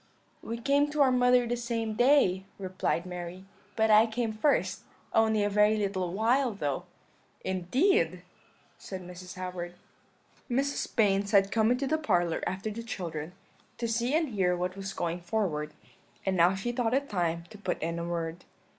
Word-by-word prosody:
"'We 230 +1 -5
came 285 +3 +3
to 295 0 0
our 265 -2 +5
mother 250 0 +4
the 240 +1 -1
same 230 -2 -2
day,' 230 -7 +4
replied 185 -2 -2
Mary; 180 +1 -7 0.3
'but 220 -1 +3
I 215 +2 +7
came 225 0 -2
first, 250 +7 +1 0.3
only 220 -1 +3
a - - +2
very 210 +1 +3
little 190 -4 -1
while 235 +5 +2
though.' 145 -8 -2 0.6
"'Indeed!' 250 - +1 0.6
said 190 -2 -7
Mrs. 180 +1 -9
Howard. 180 -1 -5 0.7
"Mrs. 275 +3 -1
Baynes 200 -3 +3
had 195 -1 +5
come 220 -1 +3
into 250 +3 +1
the 315 +3 +1
parlour 175 - +1
after 195 +4 -3
the 225 +2 -5
children, 170 -7 -5 0.4
to 235 - -2
see 235 +5 0
and 320 -2 +1
hear 185 -5 +1
what 180 +1 -2
was 195 0 -5
going 175 -1 -2
forward; 170 -6 -1 0.5
and 190 -1 +1
now 175 +2 +4
she 195 +5 -2
thought 240 0 0
it 280 +1 0
time 170 -5 -1
to 210 - -11
put 205 - -2
in 165 +1 -2
a - - -3
word. 170 0 -3
205 Hz, 170 wpm, -29 LUFS, 180-240 Hz, 0.7 s, I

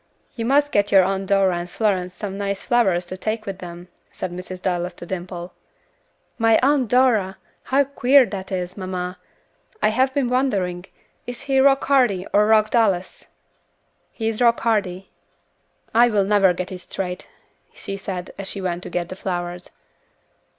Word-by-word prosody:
"You 230 - -4
must 290 +3 +3
get 205 0 +1
your 195 -1 +7
Aunt 195 +1 -1
Dora 195 -3 +2
and 175 +1 -6
Florence 185 -4 -1
some 200 -2 -5
nice 200 0 -3
flowers 190 -8 +2
to 185 +2 -7
take 215 +2 -3
with 195 -2 -6
them," 175 -1 -9 0.2
said 185 - -5
Mrs. 180 +1 -7
Dallas 180 -1 -2
to - - -9
Dimple. 175 -1 -6 0.9
"My 225 -1 +5
Aunt 275 -2 +3
Dora! 220 -6 +2 0.3
How 275 +2 +3
queer 275 -1 +4
that 195 -4 -7
is, 180 -1 -3
mamma. 185 -1 -5 0.6
I - - +3
have 260 +4 +2
been 280 -3 +1
wondering, 195 -9 0 0.4
is 245 0 -6
he 275 -1 +1
Rock 270 0 +4
Hardy 245 -10 +2
or 210 +1 +4
Rock 215 -1 +4
Dallas?" 200 -6 +1 0.9
"He 225 -2 -4
is 225 +1 -2
Rock 235 -1 +4
Hardy." 200 -5 -1 0.8
"I 235 +2 +6
never 205 -2 +3
will 180 - +2
get 180 +1 -5
it 185 - -6
straight," 180 0 -5 0.4
she 195 - -7
said, 190 -2 -6
as 195 - -4
she 200 - -4
went 180 -2 -3
to - - -7
get 175 -1 -3
the 185 - -6
flowers. 175 -1 -4
195 Hz, 170 wpm, -22 LUFS, 180-230 Hz, 0.9 s, your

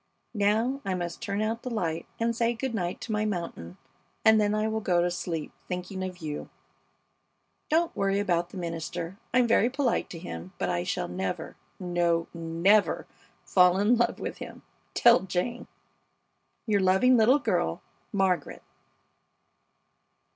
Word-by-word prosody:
Now 220 +6 +1
I 190 -1 -1
must 175 +1 -4
turn 205 -1 -1
out 225 +2 -2
the 255 - -5
light 170 -9 -2
and 230 0 +1
say 235 +1 +1
good 245 +2 -3
night 180 -5 -2
to 230 - -5
my 210 0 +1
mountain, 170 - -4 0.5
and 220 -1 +7
then 210 0 +2
I 215 +1 +1
will 220 0 -1
go 180 -4 +2
to 175 - 0
sleep 165 -3 -4 0.2
thinking 180 +1 -4
of 185 -1 -5
you. 150 -1 -5 1.2
Don't 330 +2 +2
worry 195 0 +1
about 175 -4 0
the 190 - -10
minister. 170 +2 -5
I'm 250 -1 +4
very 235 0 +4
polite 265 -2 0
to 170 - -7
him, 90 - -8
but 95 - -1
I 85 - 0
shall - - -2
never 95 +1 -4 0.2
no, 175 -2 +1
never 170 +5 +2 0.4
fall 180 -1 +5
in 210 +5 +4
love 240 0 +1
with - - -5
him - - -9 0.3
tell 240 0 +7
Jane. 190 +6 -3 1.0
Your 205 -3 +2
loving 190 +7 +5
little 240 +4 +5
girl, - - -1 0.3
MARGARET. 190 -6 0
195 Hz, 155 wpm, -28 LUFS, 175-225 Hz, 1.2 s, and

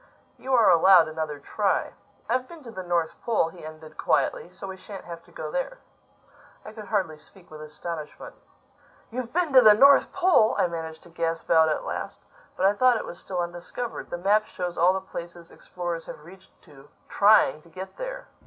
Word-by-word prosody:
You 265 0 0
are 230 -3 +5
allowed 175 0 +6
another 155 -2 -4
try. 195 +7 -1 0.3
I've 255 0 0
been 335 -3 -13
to 235 - -10
the 190 - -6
North 175 -2 -2
Pole," 220 -8 +1
he 170 0 -14
ended 155 0 -11
quietly, - - 0
"so - - -10
we 190 -1 -6
shan't 195 +1 -10
have 170 -1 -9
to - - -21
go - - -6
there." - - -3 0.9
I 215 - -9
could 215 -1 -9
hardly 185 -8 -2
speak 185 0 -19
with 155 -1 -10
astonishment. 155 0 -8 0.8
"You've 240 0 -5
been 340 -4 0
to 260 - +9
the 215 -3 +8
North 275 +5 +6
pole!" 360 -12 +3
I - - +3
managed 160 -2 -6
to - - -16
gasp 165 -1 -3
out 160 -1 +5
at 155 - -1
last. - - -5 0.4
"But 185 - +1
I 195 - +5
thought 250 +3 +4
it - - -5
was 175 - -8
still 180 -2 -4
undiscovered. 175 +7 -6
The - - -4
map 205 +4 +2
shows 180 -1 -5
all 175 +2 +4
the 190 - -3
places 170 -2 -9
explorers 175 -2 -6
have 150 - -10
reached 190 +2 -17
to, 140 0 -17 0.2
trying 200 -8 +4
to 170 - -20
get 185 +4 -9
there. - - -6
185 Hz, 200 wpm, -25 LUFS, 165-225 Hz, 0.9 s, to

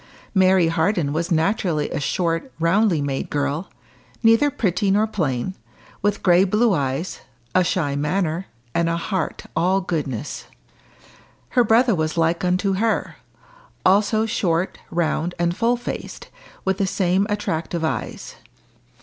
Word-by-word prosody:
Mary 190 -3 +4
Harden 165 -2 +1
was 165 +2 -1
naturally 165 -2 0
a - - -2
short, 165 - -1
roundly 170 -1 +2
made 135 -1 -3
girl, 145 +4 -2 0.5
neither 225 +6 +5
pretty 200 -5 0
nor 205 +3 +3
plain, 165 - -2 0.5
with 205 0 0
grey 180 0 +5
blue 210 +3 +2
eyes, 140 +2 -2 0.3
a 185 - +4
shy 155 -5 0
manner, 165 +4 -1 0.3
and 170 0 +1
a 165 - 0
heart 190 +3 -3
all 185 +4 +2
goodness. 150 - -4 1.0
Her 245 - +3
brother 230 +2 +4
was 155 -2 -1
like 165 +1 +1
unto 185 +2 +1
her 225 +2 0 0.7
also 210 +3 +3
short, 180 -4 -1
round, 170 0 -1
and 175 0 0
full 235 +3 +2
faced, 245 - -7 0.4
with 190 0 0
the 195 - +1
same 190 +1 +1
attractive 170 -5 -2
eyes. 160 - -4
180 Hz, 130 wpm, -22 LUFS, 160-205 Hz, 1.0 s, neither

